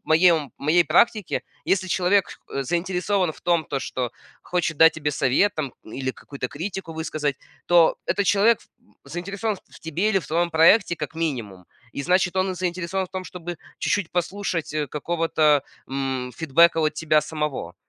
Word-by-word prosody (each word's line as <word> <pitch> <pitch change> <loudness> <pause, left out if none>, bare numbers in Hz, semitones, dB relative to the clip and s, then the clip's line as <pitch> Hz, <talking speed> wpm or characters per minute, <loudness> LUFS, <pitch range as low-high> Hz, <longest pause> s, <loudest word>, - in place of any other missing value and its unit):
моей, 165 +3 +5
ну, 150 -5 -1
в - - -34
моей 160 +4 +4
практике, 215 -2 +2 0.2
если 190 -1 +1
человек 185 +2 +2 0.2
х 140 - -3
заинтересован 180 +3 0
в - - -17
том 170 -2 +2
то, 140 - -3
что 125 -2 -3 0.3
хочет 170 -3 -1
дать 160 +2 +7
тебе 150 -2 -2
совет 140 +11 +2
там 140 -5 -3
или 130 +4 -4
какую-то 130 -1 -7
критику 175 +1 -5
высказать, 155 -3 -2 0.3
то 170 -2 +5
этот 205 - 0
человек 210 +3 +4
ф - - -22 0.4
заинтересован 200 +5 -3
в - - -13
в - - -13
тебе 170 +6 -1
или 195 - +3
в - - -9
твоем 170 +2 0
проекте, 170 +3 +5
как 150 0 -5
минимум. 125 - -3 0.3
И 140 - -4
значит 180 +4 +2
он 185 0 +1
заинтересован 185 +1 -2
в - - -30
том, 185 -1 -4
чтобы 175 -2 -7 0.2
чуть-чуть 205 -5 0
послушать, 175 -3 -2
э, 150 -1 -1
какого-то, 155 -1 +1 0.2
м, 130 -2 -3
фидбэка 165 +4 +4
от 155 -1 +1
тебя 155 -1 +2
самого. 150 - -4
165 Hz, 175 wpm, -24 LUFS, 150-185 Hz, 0.4 s, дать